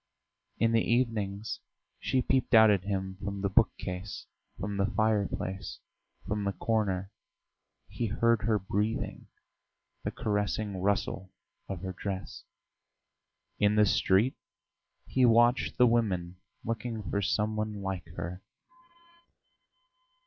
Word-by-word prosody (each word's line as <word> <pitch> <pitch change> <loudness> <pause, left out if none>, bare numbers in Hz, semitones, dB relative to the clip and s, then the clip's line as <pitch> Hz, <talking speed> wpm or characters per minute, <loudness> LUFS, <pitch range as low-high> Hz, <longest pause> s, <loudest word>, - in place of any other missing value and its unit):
In 115 0 +3
the 115 -1 +4
evenings 110 -4 0 0.4
she 130 -1 +1
peeped 130 -2 +2
out 110 -1 +8
at 95 -2 +1
him 95 -2 -2
from 100 0 -3
the 100 - +1
bookcase, 95 -3 0 0.3
from 100 +2 -3
the 100 0 +2
fireplace, 100 -2 -1 0.5
from 105 0 -2
the 100 0 -1
corner 100 -4 -1 0.8
he 120 - -3
heard 115 0 +2
her 110 0 +2
breathing, 105 +3 -2 0.8
the - - -1
caressing 105 -1 -1
rustle 95 -1 -1 0.4
of 95 -3 -4
her 95 -1 -3
dress. 95 +1 -5 1.2
In 105 0 +4
the 105 0 +6
street 100 +5 +3 0.7
he 130 - +1
watched 120 +1 +4
the 125 - +7
women, 95 -7 +1 0.3
looking 115 -2 -3
for 100 - +1
some 105 +3 0
one 105 -2 -3
like 95 -3 -3
her. 85 +2 -5
105 Hz, 120 wpm, -30 LUFS, 95-115 Hz, 1.2 s, out